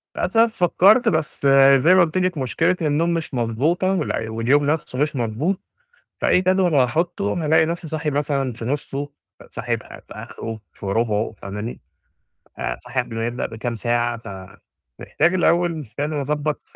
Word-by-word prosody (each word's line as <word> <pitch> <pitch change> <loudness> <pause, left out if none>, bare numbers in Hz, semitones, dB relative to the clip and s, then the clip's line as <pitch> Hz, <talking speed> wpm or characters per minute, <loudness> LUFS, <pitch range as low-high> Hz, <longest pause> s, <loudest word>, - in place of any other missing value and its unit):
للاسف 230 0 +2
فكرت، 200 +7 +5
بس، 155 -2 -1 0.3
زَي 165 +8 +5
ما 185 - +6
قلُت 170 +1 +1
لِك 185 -2 0
مُشكلة 155 +7 +1
النوم 160 +2 +1
مش 165 -3 -4
مضبوطة، 135 +11 0
وال 150 -10 -2
واليوم 120 +6 +2
نفسه 150 -3 -2
مش 150 0 0
مضبوط. 130 - -1 0.6
فأي - - +3
جدول 185 -2 +2
هاحطه 140 - +1
أنا 160 +4 -2
ألاقي 160 +1 +4
نفسي 170 0 -4
صاحي 155 0 -2
مثلًا 140 -2 -1
في 115 0 -8
نُصه، 140 +2 -3 0.4
صاحي - - -2
في - - -12
في - - -11
آخره، 115 -1 -7
في - - -10
رُبعه 110 +1 0
فاهماني؟ 105 +4 -6 0.8
آآ، - - -3
صاحي 130 - -3
قبل 125 -2 -4
ما 115 0 -2
يبدأ 120 +1 -3
بكام 115 +1 -4
ساعة، 120 +1 0
فمحتاج 95 - -4
الأول 170 -3 +1
فعلًا 145 0 -1
أضبط 150 +1 -2
145 Hz, 160 wpm, -21 LUFS, 120-170 Hz, 0.8 s, ما